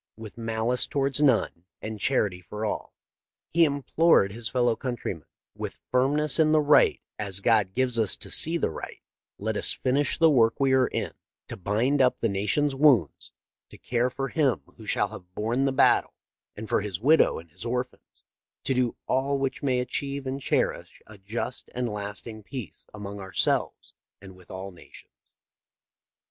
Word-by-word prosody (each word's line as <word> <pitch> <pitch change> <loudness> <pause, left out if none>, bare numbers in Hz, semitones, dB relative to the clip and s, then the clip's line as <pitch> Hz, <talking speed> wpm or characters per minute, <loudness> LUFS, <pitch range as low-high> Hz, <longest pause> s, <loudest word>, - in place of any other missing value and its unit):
" - - -62
With 110 - -10
malice 115 +1 -1
towards 140 +1 0
none, 115 - +2
with 110 -1 -6
charity 100 -8 0
for 105 +4 -5
all," - - -4 0.6
he 170 0 +5
implored 145 - +3
his 115 +1 -4
fellow 120 -2 +2
countrymen, 120 - -5 0.2
" - - -66
with - - -6
firmness 145 +4 +2
in 155 -1 +4
the 155 - +5
right 150 0 +4 0.2
as 100 -2 0
God 105 -3 +2
gives 125 -2 0
us 110 -4 +2
to - - -7
see 165 +2 +3
the 160 - -1
right, - - -8 0.3
let 110 +1 -2
us - - +3
finish 135 +2 0
the 165 -1 +5
work 115 -3 +3
we 135 -1 +3
are 130 -1 +4
in, - - -3 0.4
to - - -5
bind 115 +9 +1
up 125 -1 +3
the 115 - +1
nation's 105 +9 0
wounds, 135 - +3 0.4
to - - -13
care 120 +1 0
for 135 +2 -4
him 135 - +1
who - - -12
shall - - +1
have 90 0 -12
borne 120 +6 0
the 135 - +2
battle 135 - +3 0.4
and 110 +1 -7
for - - +1
his 100 -4 -4
widow 150 +8 +4
and 80 0 -11
his - - -10
orphans, 125 +1 -5 0.4
to - - 0
do 125 -2 0
all 140 +2 0
which 135 -1 -2
may 130 -3 +1
achieve 140 +2 -3
and 135 +1 -4
cherish - - -1
a 110 -2 -14
just 110 +6 -5
and 125 0 -1
a - - -5
lasting 105 +2 -6
peace 115 - -9
among 100 -1 -7
ourselves 95 -1 -1 0.3
and 95 -1 -13
with 90 -1 -18
all 95 +1 -7
nations." 90 - -15
120 Hz, 180 wpm, -26 LUFS, 105-135 Hz, 0.6 s, he